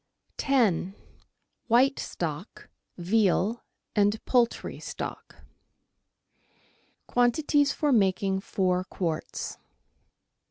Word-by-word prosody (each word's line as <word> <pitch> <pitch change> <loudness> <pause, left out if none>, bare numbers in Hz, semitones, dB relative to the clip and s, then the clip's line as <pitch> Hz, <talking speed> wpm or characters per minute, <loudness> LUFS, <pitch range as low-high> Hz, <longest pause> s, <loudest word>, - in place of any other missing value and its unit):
,0— 205 - +2 0.7
WHITE 255 +4 +4
STOCK, - - -5 0.3
VEAL 200 +3 +1 0.3
AND 205 +1 +3
POULTRY 240 -2 +1
STOCK - - -7 1.7
Quantities 285 +4 +2
for 295 0 0
making 195 -3 +2
Four 185 -2 0
Quarts. 170 -4 -4
215 Hz, 70 wpm, -27 LUFS, 190-245 Hz, 1.7 s, WHITE